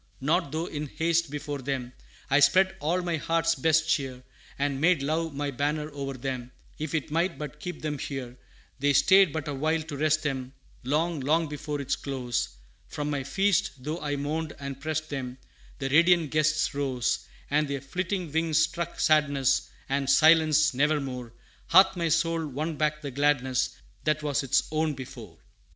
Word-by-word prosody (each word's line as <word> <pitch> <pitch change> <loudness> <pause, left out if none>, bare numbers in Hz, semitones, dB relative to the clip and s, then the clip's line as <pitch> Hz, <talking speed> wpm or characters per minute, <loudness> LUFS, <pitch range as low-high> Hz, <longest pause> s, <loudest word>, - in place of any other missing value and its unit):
not 140 0 +1
though 160 +2 -2
in 150 -3 -5
haste 165 +2 0
before 145 0 -4
them 130 -2 -4 0.3
I 135 - +4
spread 190 +6 +4
all 170 +5 0
my 170 -2 -1
heart's 165 +1 +1
best 160 -1 +2
cheer, 130 -4 -1 0.3
And 140 -1 -1
made 165 -3 +3
love 160 +1 -1
my 145 0 -2
banner 150 +3 -2
o'er 135 -1 -4
them, 130 -1 -5 0.3
If 155 +1 -3
it 150 -1 -2
might 170 +3 0
but 150 0 -7
keep 180 +1 -7
them 150 -2 -2
here; 130 -4 -5 0.4
They 145 +1 +2
stayed 190 +3 +6
but 155 -1 -4
a 145 - -2
while 155 +3 0
to 155 -2 -7
rest 155 +2 +1
them; 135 -3 -3 0.3
Long, 155 +5 0
long 155 +5 +1
before 145 0 -4
its 140 0 -1
close, 125 -3 -2 0.4
From 150 0 -3
my 145 -2 -1
feast, 195 +6 +1
though 150 +6 -5
I 145 -1 -2
mourned 150 +2 -3
and 140 -1 -6
prest 155 +1 -3
them 130 -2 -4 0.4
The 135 - -2
radiant 170 +1 +4
guests 155 0 +2
arose; 135 -4 -1 0.2
And 150 +1 +2
their 140 0 -2
flitting 180 +3 -3
wings 160 0 +1
struck 170 +1 0
sadness 140 -3 +2 0.2
And 135 0 -1
silence; 155 0 +5
never 150 +4 +2
more 125 -4 -6 0.4
Hath 190 +3 +6
my 170 -2 0
soul 165 0 +1
won 155 +4 -3
back 150 0 -1
the 140 - -4
gladness, 130 -2 +1 0.4
That 155 0 +1
was 145 -1 0
its 135 - +1
own 155 -1 0
before. 130 -1 -10
150 Hz, 175 wpm, -27 LUFS, 140-160 Hz, 0.4 s, stayed